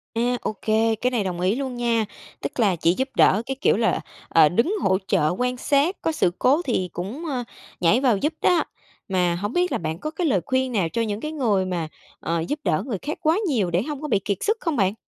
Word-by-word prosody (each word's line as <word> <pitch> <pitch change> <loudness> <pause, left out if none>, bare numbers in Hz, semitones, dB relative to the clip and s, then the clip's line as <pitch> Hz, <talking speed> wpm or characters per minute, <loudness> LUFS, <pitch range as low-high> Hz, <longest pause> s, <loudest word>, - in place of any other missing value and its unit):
A, 245 +2 +1
ô - - -2
kê, 220 +1 +2
cái 250 +4 -1
này 235 -5 0
đồng 180 -2 -3
ý 190 +5 +2
luôn 265 -2 -3
nha. 235 -2 +1 0.4
Tức - - -5
là 205 -6 +3
chỉ 170 +1 +2
giúp 265 +7 -2
đỡ 200 - +5
cái 270 +1 -3
kiểu - - +3
là, - - +1 0.3
ờ, 160 -2 +6
đứng 235 - +1
hỗ 190 - +3
trợ 160 -6 +2
quan 250 0 -1
sát, 285 +8 +2
có 325 - 0
sự 180 - +1
cố 285 +7 +4
thì 185 -8 0
cũng, 225 - -5
ơ, 260 -5 -2 0.4
nhảy 180 +7 +4
vào 250 -6 +3
giúp 300 +10 -1
đó. 355 - +4 0.5
Mà 180 -2 +1
hổng 205 +6 -3
biết 360 0 +1
là - - +1
bạn 160 0 -4
có 305 +8 -4
cái 335 +1 -1
lời 195 - +2
khuyên 260 0 0
nào 190 -8 0
cho 230 +8 -1
những 215 -1 -2
cái 305 - -4
người 220 -11 +1
mà, 175 -3 -2 0.3
ờ, 165 +1 -1
giúp 300 - -2
đỡ - - +1
người 230 -7 -3
khác 300 - -4
quá 320 +1 +3
nhiều 215 - 0
để 175 +2 +2
hông 295 -1 -5
có 300 - -3
bị 210 -8 +2
kiệt 200 -2 0
sức 435 +2 +1
không 330 -4 -1
bạn? 195 -3 +2
230 Hz, 250 wpm, -23 LUFS, 185-280 Hz, 0.5 s, ờ